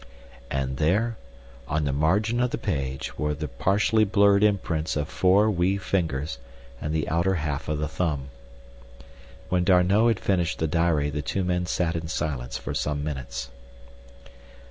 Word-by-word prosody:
And 65 -1 -2
there, 105 +9 +1 0.5
on 75 +1 0
the 70 - 0
margin 100 - +1
of 125 - +2
the - - -3
page, 70 -8 -3
were 75 0 0
the 75 +1 -4
partially 100 - +2
blurred 100 -1 +4
imprints 90 -6 +1
of 75 -1 -1
four 95 +6 +3
wee 95 +1 +1
fingers 80 -8 -2 0.4
and 75 - -2
the 80 -1 -1
outer 85 +4 +1
half 75 -2 -3
of 75 - 0
the 75 +1 -1
thumb. 75 -4 -2 1.2
When 90 -1 +2
D'Arnot 95 +4 +4
had 115 -5 +2
finished 90 -4 0
the 80 - 0
diary 80 -2 +1
the 75 +1 -2
two 95 +6 -2
men 90 -1 0
sat 85 -2 0
in 80 -1 -3
silence 70 -6 -3
for - - -5
some 75 -1 -1
minutes. 65 -3 -5
80 Hz, 160 wpm, -25 LUFS, 75-95 Hz, 1.2 s, blurred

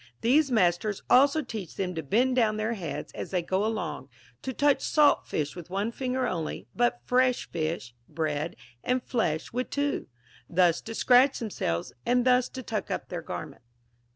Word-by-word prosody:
These 275 +5 +4
masters 200 -2 +1
also 285 +4 +5
teach 215 - -7
them 185 -2 -2
to 160 - -3
bend 245 - +2
down 220 -4 +2
their 215 +2 -1
heads 170 -9 -5
as - - -6
they 180 -2 0
go 190 +3 0
along, 220 0 -3 0.3
to 265 - -3
touch 285 +2 +2
salt 300 -2 +3
fish 150 -1 -2
with 175 -2 -9
one 200 +4 -1
finger 255 +1 -1
only, 160 - -3
but 120 0 +1
fresh 255 0 +2
fish, 155 -7 -3 0.2
bread, 155 0 -2 0.3
and 250 -1 0
flesh 175 -10 -1
with 250 +1 -2
two; 285 0 -1 0.4
thus 175 -1 +3
to 225 - -7
scratch 255 +4 +5
themselves, 85 - -3
and 245 0 +2
thus 250 -1 +4
to 260 - -7
tuck 220 -2 -3
up - - -4
their - - -4
garments. 120 - -7
215 Hz, 175 wpm, -28 LUFS, 170-255 Hz, 0.4 s, also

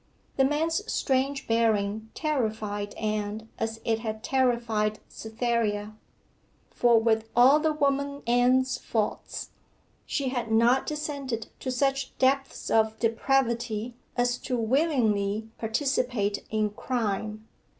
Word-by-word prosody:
The 270 - +3
man's 320 +8 0
strange 275 +1 0
bearing 220 -1 +1
terrified 215 -8 -2
Anne 215 +1 -3
as 225 0 -2
it 225 -1 +1
had 220 -1 -5
terrified 235 -5 +1
Cytherea; 220 -2 -2 0.8
for 235 -2 +4
with 225 0 +1
all 260 +5 +7
the 315 0 +2
woman 280 -1 0
Anne's 250 +2 +3
faults, 215 -2 -3 0.6
she 275 -2 -1
had 245 -3 -3
not 235 +4 +4
descended 280 -6 -3
to 260 - -4
such 270 +1 0
depths 270 +1 +1
of 220 0 +3
depravity 235 -1 0 0.2
as 245 0 +1
to 250 - -2
willingly 225 -5 +1
participate 225 -3 -1
in 215 -1 0
crime. 215 -1 -3
235 Hz, 110 wpm, -27 LUFS, 220-265 Hz, 0.8 s, all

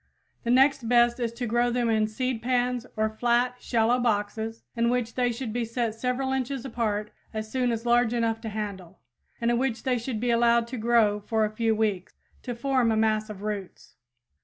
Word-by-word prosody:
The 235 - -3
next 260 -1 +4
best 240 0 +4
is 235 -2 -1
to 245 +1 -4
grow 240 +1 +2
them 240 0 0
in 220 -1 +2
seed 245 +2 -2
pans 250 0 0
or 215 0 +2
flats 240 +3 0
(shallow 235 +1 +2
boxes) 220 0 -1
in 235 0 +2
which 240 -2 -1
they 245 -1 +1
should 235 -2 -5
be 240 0 -1
set 230 -1 -2
several 250 +3 -2
inches 265 0 -2
apart 215 -4 -2 0.2
as 215 0 -4
soon 250 -2 +1
as 230 0 -3
large 240 -1 +3
enough 230 -2 0
to 225 - -4
handle, 200 -5 -6 0.4
and 235 0 +1
in 240 - +1
which 255 -3 -1
they 250 -2 +1
should 230 -1 -4
be 240 +1 0
allowed 235 0 +4
to 255 - -5
grow 220 -2 +3
for 220 +1 0
a 210 - -3
few 225 0 +1
weeks, 210 -4 -1 0.3
to 245 - -5
form 255 -1 +1
a 220 - +1
mass 215 0 +1
of 205 -1 -8
roots. 205 -3 -6
235 Hz, 205 wpm, -26 LUFS, 220-245 Hz, 0.4 s, next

